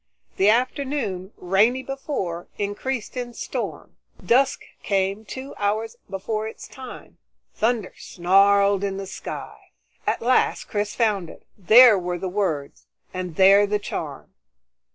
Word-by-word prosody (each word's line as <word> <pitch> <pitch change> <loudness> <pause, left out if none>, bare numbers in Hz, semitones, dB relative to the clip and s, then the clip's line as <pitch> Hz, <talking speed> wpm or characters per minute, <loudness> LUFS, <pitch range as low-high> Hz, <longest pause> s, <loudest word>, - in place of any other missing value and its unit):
The 195 +2 +4
afternoon, 240 -5 -1
rainy 215 +8 +2
before, 265 - -4
increased 210 +5 -3
in 245 -1 -5
storm. - - -5 0.3
Dusk 265 +3 +3 0.2
came 195 +2 -1
two 265 +5 -7
hours 220 +3 -1
before 215 +3 -3
its 220 - -9
time; 260 -1 -11 0.3
thunder 225 -3 0
snarled 200 +2 +3
in 195 -1 -2
the 195 - -5
sky. 190 - -7 0.5
At - - 0
last 250 +2 +2
Chris 205 0 -3
found 205 -7 +1
it. - - -14
There 220 +2 +7
were 180 0 -3
the 185 +1 -4
words, 180 -8 -3 0.3
and 180 -3 -5
there 195 +3 +6
the 210 +1 +1
charm. 205 - -6
205 Hz, 130 wpm, -23 LUFS, 190-240 Hz, 0.5 s, There